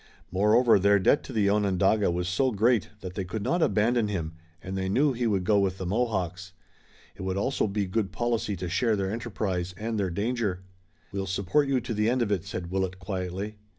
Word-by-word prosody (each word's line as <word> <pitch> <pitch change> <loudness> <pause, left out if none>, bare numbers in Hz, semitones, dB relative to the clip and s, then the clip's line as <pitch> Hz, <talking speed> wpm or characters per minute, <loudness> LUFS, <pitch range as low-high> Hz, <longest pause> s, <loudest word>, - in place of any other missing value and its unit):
Moreover 105 +4 +4
their 100 +1 +5
debt 100 +9 +3
to - - -8
the 105 -3 +2
Onondaga 100 0 +2
was 90 +1 -1
so 130 +9 +2
great 115 +1 +2
that 90 -1 -6
they 95 - -3
could 95 +3 -5
not 170 +9 +1
abandon 110 -1 +2
him, 85 -6 -3 0.3
and 95 +3 -6
they 95 0 -2
knew 135 +7 +3
he 120 -1 -1
would 100 -4 +1
go 105 +2 +3
with 95 -1 0
the 95 - -5
Mohawks. 95 -4 -2 0.6
It - - -10
would 95 0 -2
also 130 +3 0
be 100 0 -1
good 95 +1 -1
policy 120 -4 -1
to 90 0 -5
share 110 +6 +1
their 95 -1 -1
enterprise 95 -6 -3
and 110 +1 -3
their 95 -2 0
danger. 100 -1 -2 0.5
"We'll 95 -1 -3
support 100 +10 +1
you 135 -2 +2
to 120 0 -4
the 105 +1 +1
end 125 0 +2
of 105 - -2
it," 95 -5 0
said 85 -1 -5
Willet 95 -1 -1
quietly. 95 +2 -4
100 Hz, 210 wpm, -27 LUFS, 95-115 Hz, 0.6 s, their